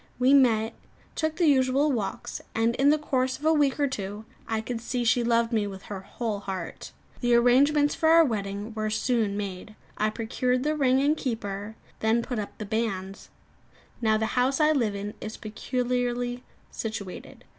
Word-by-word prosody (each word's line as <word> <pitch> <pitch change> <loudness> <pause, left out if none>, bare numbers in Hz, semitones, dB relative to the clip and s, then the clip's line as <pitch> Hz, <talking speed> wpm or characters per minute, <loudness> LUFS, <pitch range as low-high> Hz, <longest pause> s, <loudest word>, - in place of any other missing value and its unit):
We 255 +2 +4
met, 230 -5 +4 0.4
took 315 -1 -1
the 350 - +2
usual 275 0 +3
walks; 230 -1 -3
and 225 +1 +2
in 275 +2 +4
the 305 - +5
course 260 -3 -1
of 300 - -9
a 320 - +5
week 290 -3 +2
or 285 - +3
two, 205 -3 -5 0.2
I 225 -1 -1
could 230 +1 -4
see 245 +1 -2
she 240 +1 +3
loved 230 0 +2
me 210 -2 +1
with 195 -1 -8
her 200 -2 -6
whole 210 +1 -4
heart. 190 -4 -6 0.3
The 240 -1 +3
arrangments 285 +5 +4
for 320 - +2
our 330 0 +7
wedding 205 -2 -3
were 215 0 -2
soon 215 -2 0
made. 200 +1 -6 0.2
I 215 - +2
procured 250 +3 -1
the 305 +1 0
ring 265 -3 +3
and 295 +2 +3
keeper; 215 -6 -4 0.2
then 225 +2 +2
put 245 -2 -3
up 205 - -6
the 215 - -5
banns. 200 -3 -3 0.7
Now 220 -2 +3
the 220 - 0
house 260 +3 +2
I 305 0 +5
live 235 -9 +1
in 205 +1 -5
is 215 - -6
peculiarly 245 +2 -2 0.3
situated. 215 -4 -6
235 Hz, 180 wpm, -27 LUFS, 215-260 Hz, 0.7 s, our